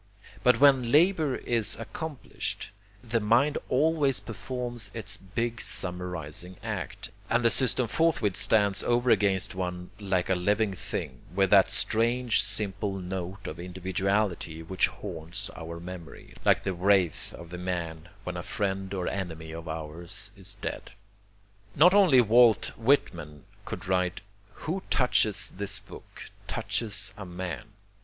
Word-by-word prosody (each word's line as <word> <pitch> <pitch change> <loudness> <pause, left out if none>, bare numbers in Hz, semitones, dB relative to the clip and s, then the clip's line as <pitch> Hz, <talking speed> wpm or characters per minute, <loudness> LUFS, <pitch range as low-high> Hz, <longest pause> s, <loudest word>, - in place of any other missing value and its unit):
But 125 - +4
when 140 -2 +7
the 120 - -3
labor 155 0 +4
is 115 -3 0
accomplished, 145 +5 -5 0.3
the 115 -1 0
mind 120 +8 +3
always 145 -1 +3
performs 120 -1 -5
its 100 -3 -2
big 115 +5 -3
summarizing 90 -1 -1
act, - - -5 0.2
and 120 0 +2
the 115 - +6
system 125 0 +2
forthwith 120 - +1
stands 100 -1 +4
over 120 0 +2
against 100 -2 +2
one 90 -1 -4
like 95 -3 0
a 95 - +2
living 100 +3 +1
thing, 90 - -5 0.2
with 95 -1 +2
that - - +7
strange 120 +2 +2
simple 100 -1 -1
note 95 +1 -5
of 80 - -6
individuality 95 -1 -1
which 95 +3 +2
haunts 90 +1 -6
our 85 0 -7
memory, 85 -1 -10
like - - +4
the 95 - -1
wraith 90 -2 +2
of 85 -1 -11
the 90 - -6
man, 85 -2 -4
when 90 -2 -4
a - - -3
friend 95 0 -2
or 90 -2 -2
enemy 80 -5 -4
of 80 +1 -7
ours 80 +5 -5
is 100 0 -8
dead. - - -6 0.8
Not 175 +6 +7
only 180 -11 +7
Walt 115 -1 +5
Whitman 85 - 0 0.2
could - - -6
write 90 -1 0 0.4
"who 185 +5 -1
touches 125 -5 +2
this 100 +1 -1
book - - -12 0.2
touches 105 -6 -1
a 105 - -6
man." 95 +5 -6
100 Hz, 140 wpm, -28 LUFS, 90-115 Hz, 0.8 s, when